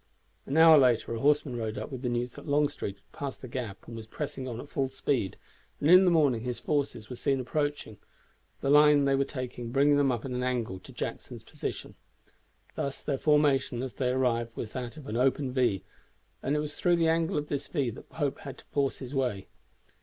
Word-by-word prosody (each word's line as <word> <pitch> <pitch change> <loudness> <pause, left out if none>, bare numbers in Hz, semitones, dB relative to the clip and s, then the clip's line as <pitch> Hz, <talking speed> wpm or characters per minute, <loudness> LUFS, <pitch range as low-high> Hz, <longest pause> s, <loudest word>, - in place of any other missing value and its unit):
An 140 - -1
hour 160 -1 +9
later 125 -3 +3
a 115 - -3
horseman 145 -1 +2
rode 110 -2 -3
up - - -5
with 130 -2 -6
the 125 - -1
news 120 +1 -2
that 145 - -11
Longstreet 145 -8 0
had 100 - -33
passed 140 -2 -6
the - - -5
Gap 120 -5 -6
and 115 - -8
was 110 -1 -8
pressing 135 +1 -5
on 120 -2 -5
at 140 - -8
full 135 -2 -1
speed, 130 -5 -1 0.4
and 150 - +3
in 185 +1 +9
the - - +5
morning 145 -9 +3
his 125 0 -3
forces 140 -7 -1
were 125 - -7
seen 135 +2 0
approaching, 145 -5 -2 0.6
the 135 - +1
line 150 -1 +6
they 140 - +3
were 135 0 +3
taking 125 -3 -6
bringing 145 +2 +4
them 140 -2 +3
up 120 0 -3
at 135 - -4
an 125 0 -2
angle 120 -7 -2
to - - -14
Jackson's - - -6
position. - - -6 0.8
Thus 140 -1 -4
their 140 -3 -1
formation 140 -5 +2
as 130 - -5
they 125 -2 -1
arrived 120 -3 0
was 110 - -4
that 125 +2 -6
of 150 - -10
an 110 -1 -3
open 130 +1 +1
V, 120 - +1 0.6
and 140 +3 0
it - - +1
was 150 -1 -5
through 175 -1 +3
the 165 -1 +2
angle 165 -1 +1
of 150 0 -2
this 145 -1 -2
V 140 -7 -1
that - - -12
Pope 145 -4 -2
had 135 - -8
to - - -16
force 140 -2 0
his 130 0 -8
way. 125 -8 -1
135 Hz, 220 wpm, -29 LUFS, 120-145 Hz, 0.8 s, hour